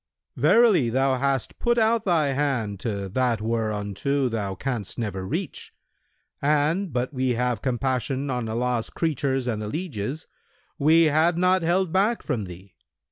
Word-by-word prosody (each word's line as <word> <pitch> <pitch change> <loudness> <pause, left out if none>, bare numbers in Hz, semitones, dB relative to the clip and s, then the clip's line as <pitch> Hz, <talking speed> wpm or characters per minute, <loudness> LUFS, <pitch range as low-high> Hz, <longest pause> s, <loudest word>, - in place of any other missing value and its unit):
Verily, 215 - +4
thou 130 +2 +1
hast 135 0 -1
put 240 0 +1
out 225 0 +2
thy 165 -6 +2
hand 130 -8 -1
to 100 -3 -3
that 120 +1 0
whereunto 110 +4 -1
thou 100 -4 -3
canst 120 -6 -4
never 95 -5 -3
reach; - - -5 0.7
and, 150 +6 +1
but 125 0 -1
that - - -15
we 130 0 0
have 125 -2 -1
compassion 130 +1 -1
on 125 -3 -2
Allah's 120 0 -1
creatures 135 -5 -1
and 110 -4 -2
the 105 - -4
lieges, 145 - -4 0.5
we 160 +3 +5
had 160 +2 +3
not 185 +1 +3
held 175 +1 +1
back 205 +5 +2
from 110 -5 -2
thee. 90 +2 -12
130 Hz, 150 wpm, -25 LUFS, 115-160 Hz, 0.7 s, we